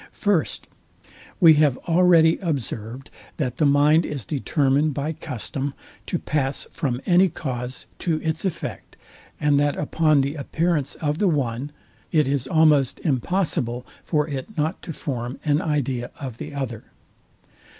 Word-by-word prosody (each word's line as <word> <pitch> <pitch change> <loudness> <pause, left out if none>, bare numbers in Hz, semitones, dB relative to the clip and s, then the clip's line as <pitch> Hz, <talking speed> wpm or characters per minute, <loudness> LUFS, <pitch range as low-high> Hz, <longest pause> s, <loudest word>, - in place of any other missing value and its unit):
First, 200 -7 0 0.7
We 165 -3 +8
have 140 -4 +3
already 170 -1 +5
observed, 130 - -4 0.3
that 125 -5 -2
the 150 - +3
mind 145 +3 +5
is 140 -8 -4
determined 145 0 +1
by 150 +3 -2
custom 140 -2 -5 0.3
to 175 - -1
pass 140 -4 -2
from 135 -7 -2
any 180 +1 +5
cause 125 -4 -5
to 165 -3 0
its 160 0 -1
effect, 190 -4 -4 0.4
and 145 -1 +3
that 145 0 +2
upon 155 -1 +2
the 140 +1 -1
appearance 160 0 -1
of 150 0 -2
the 205 - +3
one, 140 -3 -1 0.4
it 155 -4 +3
is 135 -2 0
almost 150 -4 +3
impossible 130 -4 -1 0.2
for 150 -2 0
it 145 +8 -6
not 155 +4 -1
to - - -6
form 125 -4 -4
an 150 0 +2
idea 135 -5 -1
of 130 -6 -6
the - - -6
other. 120 -5 -4
145 Hz, 140 wpm, -23 LUFS, 135-160 Hz, 0.7 s, We